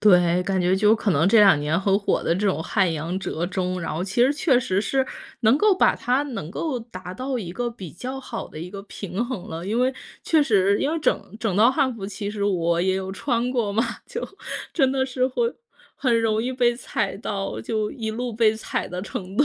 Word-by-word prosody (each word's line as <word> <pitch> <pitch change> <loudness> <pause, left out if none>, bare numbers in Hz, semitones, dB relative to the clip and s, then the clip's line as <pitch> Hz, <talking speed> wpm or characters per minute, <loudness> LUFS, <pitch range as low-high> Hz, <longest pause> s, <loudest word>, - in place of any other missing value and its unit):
对， 180 -3 +5
感 190 0 0
觉 180 +1 +3
就 210 +3 +4
可 205 -4 0
能 160 +6 +3
这 225 - +6
两 195 -8 +7
年 155 +5 0
很 195 0 +3
火 200 - 0
的 165 - +2
这 200 - -1
种 190 -5 +1
汉 185 0 +1
阳 165 +4 -3
折 170 -2 -2
中， 185 -1 -2
然 165 - -3
后 165 - -2
其 195 +5 -1
实 255 +3 +5
确 290 -4 +3
实 195 -5 0
是， 265 +4 0 0.3
能 230 +3 +5
够 420 +4 +4
把 370 - +4
它 255 +4 0
能 230 - -5
够 260 - -2
达 185 -5 -9
到 255 +2 -3
一 175 -6 -5
个 240 +4 -2
比 190 - -9
较 255 +8 -6
好 240 -3 -6
的 155 - -10
一 170 +3 -6
个 195 +1 -8
平 200 +2 -4
衡 240 -8 -5
了。 165 +2 -5
因 215 +5 -1
为， 255 +1 +2 0.3
确 315 -2 +4
实， 200 -6 +3
因 285 - +1
为 330 - 0
整 255 -7 -1
整 215 -5 -1
套 225 +4 +6
汉 265 -2 +1
服， 205 -4 -7
其 200 +1 -5
实 205 -1 -4
我 170 -4 +1
也 190 +1 +2
有 190 0 -4
穿 235 +6 -1
过 225 -5 0
嘛， 225 +4 +2 0.2
就 - - -5 0.5
真 270 -5 +3
的 265 -1 0
是 255 0 0
会， 465 - -1 0.4
很 235 -4 +2
容 220 -1 +1
易 255 +1 -2
被 240 -2 +2
踩 235 - -2
到， 195 -2 -4
就 215 -2 -1
一 225 -5 -4
路 245 +2 -3
被 220 -1 +4
踩 - - -3
的 180 +1 -4
程 190 0 -6
度， 285 - +5
210 Hz, 255 characters per minute, -24 LUFS, 185-250 Hz, 0.5 s, 两